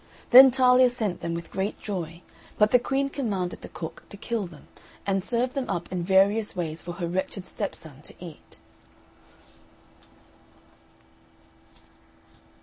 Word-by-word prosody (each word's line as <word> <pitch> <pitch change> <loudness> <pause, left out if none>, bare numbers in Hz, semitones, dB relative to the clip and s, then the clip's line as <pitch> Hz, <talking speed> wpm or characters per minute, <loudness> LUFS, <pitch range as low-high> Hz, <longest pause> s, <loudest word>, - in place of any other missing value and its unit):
Then 260 +2 +11
Talia 255 0 +5
sent 220 -7 -3
them 170 0 -3
with 170 0 -7
great 195 +2 -3
joy, 170 -4 -5 0.3
but 210 0 +4
the 250 - +6
Queen 275 +3 0
commanded 205 -11 -3
the - - -9
cook 160 -2 -7
to 200 - -9
kill 225 -2 -3
them, 165 -4 -15 0.4
and 195 -1 0
serve 245 +4 0
them 270 -2 -3
up 170 0 -3
in 180 -1 -2
various 200 +4 +3
ways 165 -3 -3
for 175 - -6
her 175 -1 -4
wretched 185 +2 -3
stepson 160 -8 -6
to - - -10
eat. 170 -4 -11
195 Hz, 140 wpm, -26 LUFS, 175-240 Hz, 0.4 s, Then